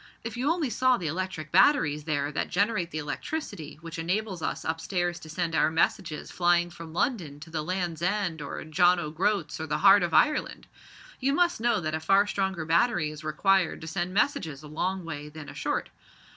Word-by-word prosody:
If 230 0 -5
you 255 +4 0
only 325 -6 0
saw 255 0 +3
the 175 - -6
electric 160 -1 -3
batteries 150 - +4
there 145 -2 -1
that 150 - -2
generate 200 -2 +1
the 155 - -5
electricity 155 - -5
which 165 0 -7
enables 185 +2 -2
us - - -3
up 160 0 -2
stairs 175 -2 -1
to 160 - -12
send 165 +1 -2
our 155 - +3
messages 160 0 -1
flying 175 0 +2
from 165 -1 -10
London 165 - -1
to 160 +1 -11
the 160 -1 -2
Land's 175 -1 -3
End 180 -3 0
or 140 - -5
John 175 +3 +3
o' 155 -3 -4
Groat's, 160 -2 0
or 160 - -4
the 150 0 0
heart 200 0 +7
of 175 -1 0
Ireland! 300 - +2 0.5
You 270 +2 +1
must 345 -5 +2
know 235 -2 +2
that 155 -1 -3
a 160 - -1
far 195 +5 +4
stronger 190 -5 -2
battery 170 -1 +2
is 155 +1 -10
required 180 +4 +2
to - - -7
send 175 +2 -3
messages 165 - 0
a - - -9
long 180 +4 -2
way 150 -2 -6
than 155 -1 -9
a - - -9
short. - - -2
175 Hz, 205 wpm, -27 LUFS, 155-195 Hz, 0.5 s, heart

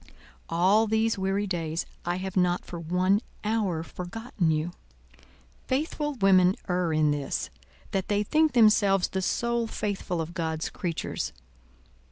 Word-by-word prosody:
"'All 190 +6 +4
these 220 0 +1
weary 195 +2 0
days' 165 -4 -2 0.2
I 175 +1 0
have 190 0 -5
not 180 -1 +2
for 170 - -7
one 180 +5 +2 0.2
hour 210 -7 0
forgotten 180 - -3
you. 155 +2 0 1.0
Faithful 295 +1 -1
women 190 -4 +5
err 180 -2 0
in 155 -1 +3
this, 145 -2 -2 0.4
that 190 -1 -1
they 205 0 +1
think 310 +7 +2
themselves 210 -5 +4
the 190 - -2
sole 235 +4 0
faithful 200 -5 -3
of 165 +1 -4
God's 160 -2 -2
creatures. 170 - -3
190 Hz, 135 wpm, -27 LUFS, 170-215 Hz, 1.0 s, women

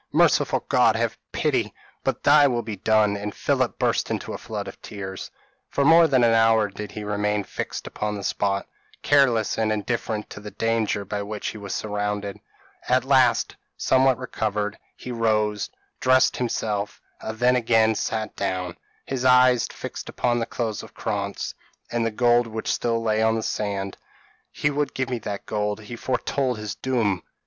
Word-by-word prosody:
Merciful - - +3
God! - - +4
have - - -1
pity - - 0 0.3
but - - -1
thy 145 0 +7
will 120 -3 0
be 110 - -5
done;" 105 +1 +3
and 105 0 -5
Philip - - 0
burst - - +1
into - - -3
a - - -4
flood - - -5
of - - -10
tears. 95 -2 -7 0.4
For 140 - +1
more 165 +2 +7
than 130 -4 +3
an 115 -1 +5
hour 115 -2 +4
did 105 +1 -8
he 105 - -5
remain 105 0 0
fixed - - -5
upon 105 0 -3
the 100 - -6
spot, 100 0 -1 0.4
careless 125 -8 +3
and 110 -1 +1
indifferent 110 0 -2
to - - -7
the 105 0 -8
danger 110 -1 0
by 105 0 -3
which 105 +1 -4
he 110 - -8
was 100 -1 -4
surrounded. 105 -1 -3 0.5
At 130 0 +3
last, 130 -3 +3 0.2
somewhat 130 -1 +3
recovered, 105 -4 -2 0.2
he 125 - -8
rose, 105 -3 0 0.3
dressed 130 0 +4
himself, 105 -4 -2 0.2
and 110 0 -6
then 125 +2 +4
again 115 -2 +3
sat 110 0 -3
down 95 -3 -2 0.3
his 130 -2 -3
eyes 125 -1 +5
fixed - - -7
upon 120 -1 0
the 115 - -2
clothes 110 -3 -3
of - - -13
Krantz, 100 -2 -3 0.4
and 120 -1 0
the 115 - +1
gold 120 +1 +3
which 110 0 -2
still 115 -1 0
lay 110 -1 +1
on 110 0 +3
the 110 - -2
sand. 100 -2 -3 0.5
"He 145 - 0
would 145 -1 -1
give 130 0 -2
me 125 - -1
that 100 -2 -5
gold. 105 0 -2
He 110 +3 -8
foretold 125 +1 -1
his 105 -1 -4
doom. 110 -8 0
110 Hz, 175 wpm, -24 LUFS, 105-125 Hz, 0.5 s, thy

